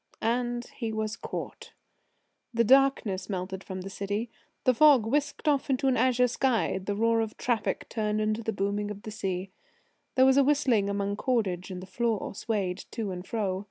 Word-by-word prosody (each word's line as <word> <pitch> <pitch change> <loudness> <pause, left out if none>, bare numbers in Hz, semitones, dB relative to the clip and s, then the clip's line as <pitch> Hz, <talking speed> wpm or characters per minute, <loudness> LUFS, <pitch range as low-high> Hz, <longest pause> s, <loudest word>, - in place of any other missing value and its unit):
And 240 +1 0
he 230 -3 -2
was 220 0 -2
caught. - - -7 0.8
The 235 - +4
darkness 255 -7 +3
melted 190 0 -4
from 185 -1 -6
the 195 - -6
city. 205 +4 -3 0.3
The 255 - +4
fog 280 -3 +6
whisked 290 +6 -1
off 285 -2 +2
into 270 +1 +1
an 260 - +3
azure 250 -1 +3
sky. 240 -6 +1
The 200 +2 -3
roar 230 +1 +2
of 220 -1 -4
traffic 235 -4 -1
turned 215 -1 -1
into 215 +1 0
booming 205 +1 -1
of 205 -1 -7
the 215 - -6
sea. 190 -2 -3 0.6
There 260 - +6
was 265 0 +5
a 280 - +6
whistling 260 -8 +2
among 200 0 -1
cordage, 205 -8 0
and 185 -1 -6
the - - -7
floor 225 +2 -1
swayed 200 -4 -2
to 220 -4 -4
and 180 0 -7
fro. 195 -5 -1
220 Hz, 180 wpm, -28 LUFS, 200-245 Hz, 0.8 s, fog